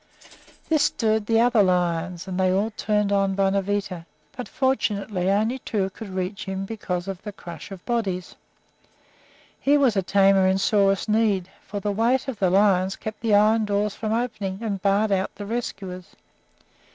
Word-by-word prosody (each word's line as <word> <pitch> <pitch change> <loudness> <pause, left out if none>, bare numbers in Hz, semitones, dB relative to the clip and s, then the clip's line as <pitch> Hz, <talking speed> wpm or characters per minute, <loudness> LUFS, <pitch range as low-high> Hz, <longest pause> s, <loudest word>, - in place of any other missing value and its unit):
This 310 -3 +3
stirred 220 -2 0
the 225 0 +3
other 235 -2 +4
lions, 180 -1 0
and 185 0 -3
they 185 -1 +3
all 200 +4 +1
turned 210 -1 0
on 195 -1 +1
Bonavita; 195 -2 -1 0.3
but, 250 - -6
fortunately, 210 -8 0
only 220 +6 +1
two 195 -5 -2
could 210 +2 -9
reach 185 +1 -4
him 190 0 -4
for 195 -4 -3
the 205 +3 -9
crush 170 -4 -10
of 195 -3 -10
bodies. 195 -7 -2 1.3
Here 290 +1 +3
was 255 -6 +3
a 195 - +2
tamer 195 0 +4
in 190 0 +2
sorest 195 0 +2
need, 210 -4 +1 0.2
for 205 - -4
the 205 +1 -2
weight 235 +6 +1
of 250 -6 -5
the 185 - +3
lions 190 0 +3
kept 215 0 -7
the 225 -3 +3
iron 215 +2 +4
doors 205 0 0
from 215 -1 -4
opening 220 -5 -2
and 200 -4 -3
barred 200 +2 +2
out 190 -1 0
the 205 - -7
rescuers. 195 -5 -5
200 Hz, 165 wpm, -24 LUFS, 190-220 Hz, 1.3 s, other